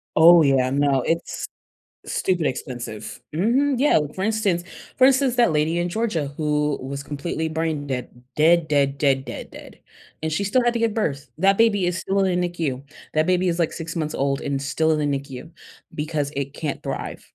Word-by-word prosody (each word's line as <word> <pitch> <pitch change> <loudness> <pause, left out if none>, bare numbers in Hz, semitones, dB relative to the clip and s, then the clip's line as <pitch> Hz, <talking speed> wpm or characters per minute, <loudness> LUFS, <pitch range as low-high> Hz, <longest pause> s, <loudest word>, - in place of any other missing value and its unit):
Oh, 170 +2 +8
yeah. 135 -3 +3
No, 140 -1 +2
it's 165 +5 -2 0.6
stupid 175 -4 0
expensive. 120 -2 -5
Mhm. 255 - +2
Yeah, 290 - +4 0.2
for 190 - -4
instance 210 -5 +1 0.4
for 260 - +7
instance, 265 -2 +3
that 240 -7 +4
lady 155 +3 +1
in 175 - 0
Georgia 175 -7 -1
who 150 -1 0
was 140 +1 -5
completely 155 +3 -3
brain 160 -2 -2
dead. 130 -2 -4 0.3
Dead, 165 +1 +4
dead, 140 -2 +1
dead, 135 -2 +2
dead, - - -7
dead, - - -12 0.4
and 160 - -1
she 160 +6 -1
still 240 +6 +2
had 240 0 +2
to 235 - 0
give 230 -2 +1
birth. 140 - -2
That 195 +3 +4
baby 210 -5 +3
is 175 0 0
still 195 +1 -1
in 180 -2 +1
the 175 - 0
NICU. 150 -7 -3 0.3
That 155 +1 +2
baby 185 0 +2
is, 170 - -1
like, 165 -2 +1
6 165 0 -6
months 155 -2 -2
old, 135 0 0
and 140 -1 -2
still 160 +3 0
in 155 - +2
the 145 -2 0
NICU 135 +3 -10 0.4
because 150 -1 -2
it 140 -1 -3
can't 150 -1 -4
thrive. - - -5
160 Hz, 195 wpm, -23 LUFS, 140-185 Hz, 0.6 s, Oh